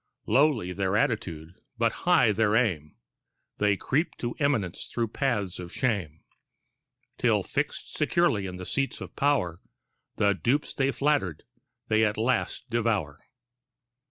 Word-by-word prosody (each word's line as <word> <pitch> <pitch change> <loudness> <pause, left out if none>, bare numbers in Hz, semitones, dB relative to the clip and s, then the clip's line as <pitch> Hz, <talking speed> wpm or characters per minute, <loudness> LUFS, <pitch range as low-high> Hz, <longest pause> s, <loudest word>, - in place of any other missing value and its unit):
Lowly 130 -10 +2
their 95 +1 0
attitude 90 - -2 0.2
but 115 -1 +2 0.2
high 125 -11 +6
their 105 0 +2
aim, 85 -11 0 0.6
They 105 -1 +3
creep 150 - -1
to 120 -1 -3
eminence 130 - 0
through 115 -2 -1
paths 105 -9 -1
of 90 -1 -7
shame, 95 - -2 1.0
Till - - +3
fixed - - -3
securely 115 - +2
in 90 -1 -6
the 90 - -7
seats 135 +6 -2
of - - -9
pow'r, 130 - +1 0.6
The 100 -1 +3
dupes 125 +9 0
they 135 0 +1
flattered 135 - 0 0.4
they 110 0 +3
at 105 -1 +1
last 125 +2 0
devour. 105 -11 0
110 Hz, 130 wpm, -27 LUFS, 90-130 Hz, 1.0 s, high